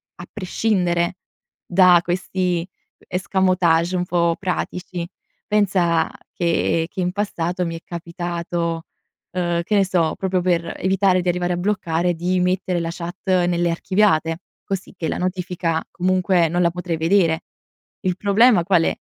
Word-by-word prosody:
a 175 Hz, -, -9 dB
prescindere 180 Hz, -3 st, 0 dB, 0.5 s
da 180 Hz, -1 st, +6 dB
questi 180 Hz, -1 st, -1 dB, 0.3 s
escamotage 185 Hz, -2 st, +1 dB
un 180 Hz, 0 st, 0 dB
po' 170 Hz, -1 st, +1 dB
pratici. 180 Hz, -2 st, -3 dB, 0.4 s
Pensa, 185 Hz, -6 st, +2 dB, 0.2 s
che 165 Hz, -1 st, +1 dB
che -, -, -8 dB
in 180 Hz, -1 st, 0 dB
passato 180 Hz, -3 st, -2 dB
mi 165 Hz, -1 st, -3 dB
è 165 Hz, -, -8 dB
capitato, 170 Hz, -1 st, -4 dB, 0.5 s
uhm, 175 Hz, -2 st, 0 dB
che 210 Hz, +5 st, -1 dB
ne 200 Hz, -1 st, +4 dB
so 175 Hz, -4 st, +1 dB
proprio 190 Hz, -1 st, 0 dB
per 175 Hz, -2 st, 0 dB
evitare 190 Hz, -1 st, +2 dB
di 180 Hz, -, -1 dB
arrivare 180 Hz, 0 st, 0 dB
a -, -, -2 dB
bloccare, 175 Hz, -3 st, 0 dB
di 180 Hz, +2 st, 0 dB
mettere 180 Hz, 0 st, 0 dB
la 165 Hz, 0 st, -2 dB
chat 170 Hz, +1 st, -6 dB, 0.3 s
nelle 175 Hz, 0 st, +1 dB
archiviate, 165 Hz, -2 st, +1 dB, 0.3 s
così 195 Hz, -1 st, -4 dB
che 165 Hz, -, -2 dB
la -, -, -2 dB
notifica 180 Hz, -2 st, -1 dB
comunque 185 Hz, -2 st, +2 dB
non 175 Hz, +2 st, 0 dB
la 170 Hz, -, +4 dB
potrei 175 Hz, -1 st, -3 dB
vedere. 165 Hz, 0 st, +2 dB, 0.6 s
Il 185 Hz, -2 st, -1 dB
problema 210 Hz, 0 st, +4 dB
qual 175 Hz, -3 st, +4 dB
è? -, -, 0 dB
180 Hz, 145 wpm, -21 LUFS, 170-185 Hz, 0.6 s, da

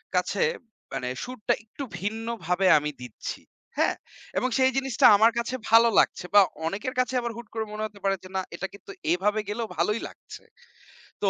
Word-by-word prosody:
কাছে -, -, +1 dB, 0.5 s
মানে 125 Hz, -2 st, -2 dB
সুরটা 250 Hz, -3 st, -1 dB
একটু 225 Hz, +6 st, -8 dB, 0.2 s
ভিন্নভাবে 210 Hz, -3 st, -1 dB
আমি 150 Hz, 0 st, -1 dB
দিচ্ছি, 125 Hz, -3 st, -6 dB, 0.4 s
হ্যাঁ? -, -, +2 dB, 0.4 s
এবং 255 Hz, -, +1 dB
সেই 260 Hz, 0 st, +4 dB
জিনিসটা 270 Hz, -2 st, +2 dB
আমার 220 Hz, +3 st, +6 dB
কাছে 235 Hz, +2 st, -2 dB
ভালো 230 Hz, +1 st, +7 dB
লাগছে -, -, +1 dB
বা 205 Hz, -, +9 dB, 0.3 s
অনেকের 210 Hz, +8 st, -3 dB
কাছে 255 Hz, +1 st, +1 dB
আবার 235 Hz, -, -3 dB
হুট 235 Hz, -2 st, -9 dB
করে 220 Hz, -1 st, -2 dB
মনে 215 Hz, 0 st, -4 dB
হতে 205 Hz, -1 st, -9 dB
পারে 195 Hz, 0 st, +2 dB
যে, 185 Hz, -, -11 dB
না 190 Hz, -, +1 dB
এটা 195 Hz, +3 st, -4 dB
কিন্তু 200 Hz, 0 st, -11 dB, 0.2 s
এভাবে 205 Hz, +5 st, +1 dB
গেলেও 225 Hz, +1 st, -2 dB
ভালোই 210 Hz, +7 st, +1 dB
লাগছে। -, -, -13 dB, 0.8 s
তো -, -, +4 dB
215 Hz, 175 wpm, -26 LUFS, 195-235 Hz, 0.8 s, বা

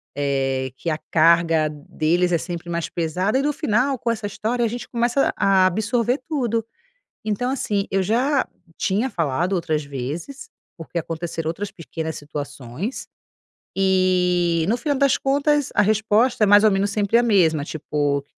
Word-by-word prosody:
eh, 135 Hz, -2 st, -1 dB
que 170 Hz, -, -3 dB
a 155 Hz, -1 st, -1 dB
carga 165 Hz, -1 st, +4 dB
deles 155 Hz, +4 st, -1 dB
é 170 Hz, -, +3 dB
sempre 170 Hz, +1 st, -6 dB
mais 170 Hz, -1 st, -2 dB
pesada 180 Hz, +7 st, -1 dB
e -, -, +1 dB
no 295 Hz, +2 st, +1 dB
final, 265 Hz, -1 st, +1 dB
com 235 Hz, 0 st, -1 dB
essa 220 Hz, -2 st, -3 dB
história, 230 Hz, +4 st, -2 dB
a -, -, +3 dB
gente 240 Hz, +2 st, -6 dB
começa 240 Hz, +3 st, +1 dB
a 195 Hz, -1 st, +4 dB
absorver 230 Hz, +7 st, +1 dB
tudo, 235 Hz, -7 st, -1 dB, 0.6 s
então 215 Hz, +4 st, -1 dB
assim, 210 Hz, -7 st, -1 dB
eu 195 Hz, 0 st, +1 dB
já 255 Hz, +8 st, +1 dB, 0.3 s
tinha 210 Hz, +6 st, 0 dB
falado 170 Hz, -, -1 dB
outras 155 Hz, -4 st, -1 dB
vezes. 150 Hz, -, -6 dB, 0.3 s
Porque 165 Hz, +1 st, -5 dB
aconteceram 165 Hz, 0 st, -4 dB
outras 195 Hz, +5 st, -4 dB
pequenas 160 Hz, -1 st, -6 dB
situações, 145 Hz, -, -6 dB, 0.7 s
e 180 Hz, -3 st, +2 dB
no 230 Hz, -, +2 dB
final 285 Hz, +3 st, -1 dB
das 275 Hz, -1 st, +3 dB
contas, 285 Hz, +1 st, +1 dB
a 205 Hz, -, +4 dB
resposta 220 Hz, +3 st, +2 dB
é -, -, +3 dB
mais 205 Hz, +1 st, +7 dB
ou 215 Hz, -, +6 dB
menos 195 Hz, +1 st, +1 dB
sempre 205 Hz, +2 st, +2 dB
a -, -, +3 dB
mesma, 165 Hz, -10 st, +3 dB
tipo, 145 Hz, -2 st, -2 dB
190 Hz, 160 wpm, -22 LUFS, 160-235 Hz, 0.7 s, mais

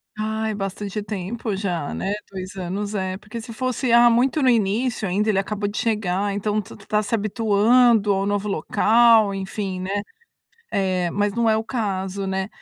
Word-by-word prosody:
Ai, 220 Hz, 0 st, -2 dB
bastante 200 Hz, +1 st, -4 dB
tempo 210 Hz, +2 st, -4 dB
já, 180 Hz, -7 st, -2 dB
né. 195 Hz, -, -2 dB, 0.2 s
2 185 Hz, 0 st, -7 dB
anos 195 Hz, +3 st, -4 dB
é, 190 Hz, -2 st, -2 dB
porque 215 Hz, +3 st, -8 dB
se 230 Hz, -, -9 dB
fosse, 255 Hz, +2 st, -1 dB
ah, 235 Hz, 0 st, +7 dB
muito 260 Hz, +5 st, +2 dB
no 260 Hz, -, +5 dB
início 225 Hz, 0 st, +1 dB
ainda, 200 Hz, +4 st, 0 dB
ele 205 Hz, -3 st, +2 dB
acabou 205 Hz, +1 st, -2 dB
de 205 Hz, -, -6 dB
chegar. 205 Hz, -3 st, 0 dB
Então 210 Hz, +1 st, 0 dB
tá 195 Hz, -, -12 dB
tá 210 Hz, 0 st, +2 dB
se 230 Hz, -, 0 dB
habituando 220 Hz, +1 st, +3 dB
ao 195 Hz, 0 st, 0 dB
novo 205 Hz, 0 st, -1 dB
local. 220 Hz, +3 st, +4 dB
Enfim, 195 Hz, -1 st, -4 dB
né. 200 Hz, +2 st, -2 dB, 0.7 s
Eh, 185 Hz, -2 st, 0 dB
mas 205 Hz, 0 st, 0 dB
não 235 Hz, -1 st, +2 dB
é 220 Hz, -, +4 dB
o 220 Hz, -, -1 dB
caso, 200 Hz, -5 st, -3 dB
né. 190 Hz, 0 st, -2 dB
205 Hz, 175 wpm, -22 LUFS, 195-225 Hz, 0.7 s, ah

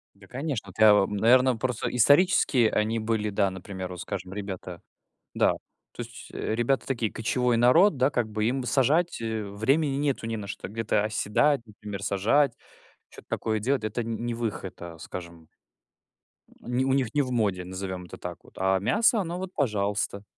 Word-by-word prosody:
Да, 100 Hz, 0 st, -17 dB
конечно. 135 Hz, -3 st, -4 dB
Вот 95 Hz, -, -14 dB
я 110 Hz, -1 st, +8 dB
вам 105 Hz, 0 st, +2 dB
наверно, 125 Hz, +4 st, +5 dB
просто 125 Hz, 0 st, -2 dB
исторически 140 Hz, -, +4 dB
они 110 Hz, +2 st, +1 dB
были 110 Hz, -1 st, -1 dB
да, 100 Hz, -1 st, +1 dB
например, 95 Hz, 0 st, -7 dB
вот 90 Hz, -1 st, -7 dB
скажем, 95 Hz, 0 st, -5 dB
ребята 95 Hz, -3 st, -6 dB, 0.5 s
Да, -, -, +3 dB, 0.4 s
то -, -, -6 dB
есть, -, -, -11 dB
э, -, -, -2 dB
ребята 120 Hz, +4 st, 0 dB
такие, 120 Hz, -5 st, -1 dB
кочевой 125 Hz, +1 st, 0 dB
народ, 145 Hz, -, +5 dB
да, 130 Hz, +2 st, +3 dB
как 120 Hz, -5 st, -1 dB
бы, 110 Hz, 0 st, -2 dB
им 130 Hz, +4 st, 0 dB
сажать, 145 Hz, +7 st, +2 dB
э, 110 Hz, -2 st, -3 dB
времени 135 Hz, +8 st, +1 dB
нету, 140 Hz, -5 st, -1 dB
не 115 Hz, 0 st, -2 dB
на 105 Hz, -2 st, -6 dB
что 100 Hz, -, -6 dB
где-то 110 Hz, 0 st, 0 dB
оседать, 110 Hz, +6 st, +1 dB
например, 105 Hz, -2 st, -8 dB
сажать, 115 Hz, +9 st, +2 dB, 0.6 s
чё-то -, -, -14 dB
такое 110 Hz, -1 st, -1 dB
делать. 130 Hz, +4 st, 0 dB
Это 110 Hz, +2 st, -2 dB
не 115 Hz, 0 st, -3 dB
не 120 Hz, 0 st, -3 dB
выход, 110 Hz, -5 st, -4 dB
а, 85 Hz, -1 st, -8 dB
скажем 85 Hz, -1 st, -9 dB, 1.1 s
Не 125 Hz, +2 st, -1 dB
у 135 Hz, -, +2 dB
них 130 Hz, -4 st, 0 dB
не 145 Hz, -, +3 dB
в 130 Hz, -2 st, -3 dB
моде, 100 Hz, -7 st, 0 dB
назовем 95 Hz, 0 st, -5 dB
это 90 Hz, -, -10 dB
так -, -, -8 dB
вот. -, -, -19 dB
А 95 Hz, 0 st, +2 dB
мясо, 220 Hz, -, +3 dB
оно 175 Hz, -2 st, -3 dB
вот, 185 Hz, 0 st, -6 dB
пожалуйста. 100 Hz, -5 st, -1 dB
110 Hz, 185 wpm, -27 LUFS, 100-130 Hz, 1.1 s, я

